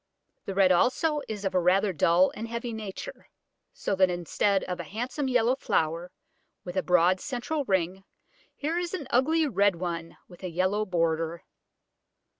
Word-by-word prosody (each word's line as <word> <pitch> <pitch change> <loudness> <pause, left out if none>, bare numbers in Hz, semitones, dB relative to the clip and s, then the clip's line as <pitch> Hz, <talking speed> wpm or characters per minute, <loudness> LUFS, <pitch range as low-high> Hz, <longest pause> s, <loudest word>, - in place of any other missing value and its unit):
The 195 - -4
red 190 -1 +5
also 290 - +2
is 210 -2 -5
of 190 - -1
a 185 - +3
rather 185 +3 +3
dull 170 +4 +4
and 225 - -5
heavy 235 +1 -4
nature, 220 - -7 0.4
so - - -3
that 185 -1 +5
instead 180 +3 0
of 180 - -4
a - - -3
handsome 250 +6 -3
yellow 250 -1 +3
flower 170 - -1 0.5
with 180 0 -7
a 185 - +2
broad 180 +1 +3
central 275 +5 -3
ring, 190 -1 0 0.5
here 320 +4 -1
is 355 +1 -3
an 305 - -5
ugly 310 +6 +3
red 200 -5 +2
one 170 -1 -5
with 175 - -15
a 185 - -3
yellow 185 +5 0
border. 165 -1 -1
195 Hz, 165 wpm, -27 LUFS, 180-245 Hz, 0.5 s, red